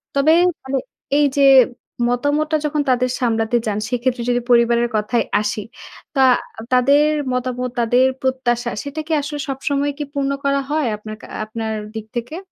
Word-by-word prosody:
তবে 280 +3 +4 0.3
মানে 265 +1 -2 0.4
এই 295 - +4
যে - - +4 0.7
মতামতটা 290 +5 0
যখন 300 0 0
তাদের 255 0 +2
সামলাতে 225 -1 0
যান, 210 -1 -1
সেক্ষেত্রে 245 0 -1
যদি 245 0 +1
পরিবারের 235 0 +4
কথায় 215 +3 +1 0.2
আসি। 210 0 -2 0.5
তা 270 - +2 0.4
আ - - -6
তাদের 280 +4 +5 0.3
মতামত, 250 0 -2
তাদের 245 +2 +3 0.2
প্রত্যাশা 245 -2 0
সেটা 285 +2 -6
কি - - -6
আসলে 290 +1 -5
সবসময় 280 +1 -1
কি 300 - -3
পূর্ণ 275 -1 -1
করা 280 0 +2
হয়? 300 -2 0
আপনার 215 +1 -8
কা - - -11 0.2
আপনার 220 0 -4 0.2
দিক 220 -1 -5
থেকে? 240 +7 -4
250 Hz, 160 wpm, -20 LUFS, 235-280 Hz, 0.7 s, তাদের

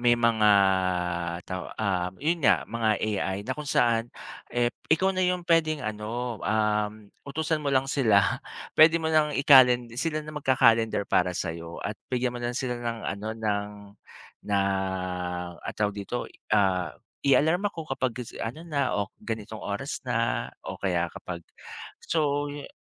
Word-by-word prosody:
may 120 -1 +4
mga 115 -2 +3 1.0
taw 90 -2 -5
ah, 95 -4 0
yun 165 +3 0
nga - - +4
mga 110 -3 0
AI 100 -3 -1
na 130 - -1
kung 150 0 -7
saan, 115 -2 +2 0.4
eh, 120 0 0 0.2
ikaw 190 +4 +3
na 185 - +1
yung 180 -1 0
pwedeng 155 -5 +2
ano, 110 +2 -4
um, 105 -1 +1 0.3
utusan 155 +2 -2
mo 140 - 0
lang 135 0 +2
sila, 110 -8 +2 0.3
pwede 160 +1 +7
mo 160 - -3
nang 155 -1 +3
ikalen 125 -4 +6
sila 155 +5 -1
na 155 0 -9
magka-calendar 115 -7 +3
para 90 0 +2
sa'yo 85 -1 -5
at 105 - -4 0.2
bigyan 125 -1 0
mo 120 - -6
lang 120 +1 -2
sila 125 -2 -2
ng 120 -1 -3
ano 100 +2 -4
ng 105 -2 -1 0.8
na, 100 -1 0 1.0
ano - - -7
tawag 105 -1 +1
dito, 105 +4 -4 0.3
ah, 95 -3 +2 0.3
i-alarm 160 +7 +3
ako 165 -5 -7
kapag 130 -2 0
gisi 125 - -7
ano 120 +8 -4
na 145 -4 0
o 100 -1 -1
ganitong 110 -2 -5
oras - - -4
na - - 0
o - - -6
kaya 90 -3 0
kapag 85 0 -7 0.6
so 145 -2 0
yu 145 0 -8
120 Hz, 155 wpm, -27 LUFS, 105-145 Hz, 1.0 s, pwede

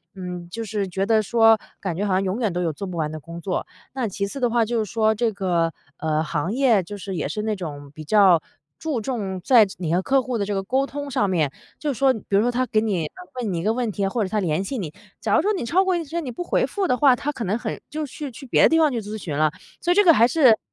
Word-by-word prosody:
嗯， 180 -2 -6
就 230 +4 -5
是 205 -2 -2
觉 190 +2 -1
得 220 0 +3
说， 225 +1 +5 0.2
感 180 -4 -2
觉 205 - -1
好 195 - 0
像 190 +1 +2
永 195 +5 -2
远 215 -7 0
都 180 - -1
有 165 -2 0
做 190 +7 -6
不 180 - -6
完 155 -1 -1
的 155 - -6
工 170 +3 -9
作。 185 -1 -2 0.3
那 255 -4 -1
其 200 0 -2
次 275 - -7
的 245 -2 +2
话 235 0 +2
就 230 +1 -1
是 210 - -8
说 220 -1 +3
这 230 +1 +1
个， 175 -4 0 0.2
呃 160 - -8
这 - - +2
个 - - +1
行 165 +5 -2
业 240 -7 +3 0.3
也 155 - -2
是 210 +8 -3
那 215 -1 -1
种 145 -6 -7
比 155 - -8
较 190 -4 +5 0.4
注 305 -7 -2
重 205 -6 -3
在 235 -5 +6
你 165 -2 -1
和 185 - +2
客 270 +5 +2
户 250 -2 -3
的 200 - -1
这 205 - -2
个 195 - 0
沟 265 +6 +1
通 285 0 -6
上 205 -5 +1
面。 155 -7 +1 0.3
就 295 -2 -1
是 250 - -6
说 270 -1 +5
比 220 - -8
如 - - +5
说 245 +2 +1
他 255 +1 0
给 215 - +2
你 185 -8 -1 0.3
问 205 -6 -2
一 165 - -2
个 220 +2 +2
问 240 -2 -1
题， 200 0 -1
或 225 +3 -1
者 185 - -3
他 215 0 0
联 170 0 0
系 265 +6 -4
你， 165 -7 -5 0.3
假 - - +1
如 325 - +4
说 415 +4 +1
你 360 - -3
超 370 +10 +3
过 375 -1 +1
1 335 - -3
天， 335 +3 -3
你 255 - -5
不 355 - -5
回 - - +1
复 395 -3 -2
的 250 - +2
话， 260 -1 +5
他 295 +5 -3
可 235 - -5
能 205 +5 0
很 - - -4
就 305 0 -3
去 290 +1 -7
去 255 +4 -11
别 250 - +3
的 - - +7
地 325 - +3
方 305 -3 +4
去 235 -3 -2
咨 210 +1 -6
询 155 -8 -5
了， 155 -1 +3 0.3
所 350 - +1
以 - - +3
这 415 - +6
个 335 - +8
还 235 -1 +5
是 255 -6 +5
215 Hz, 315 characters per minute, -23 LUFS, 185-255 Hz, 0.4 s, 个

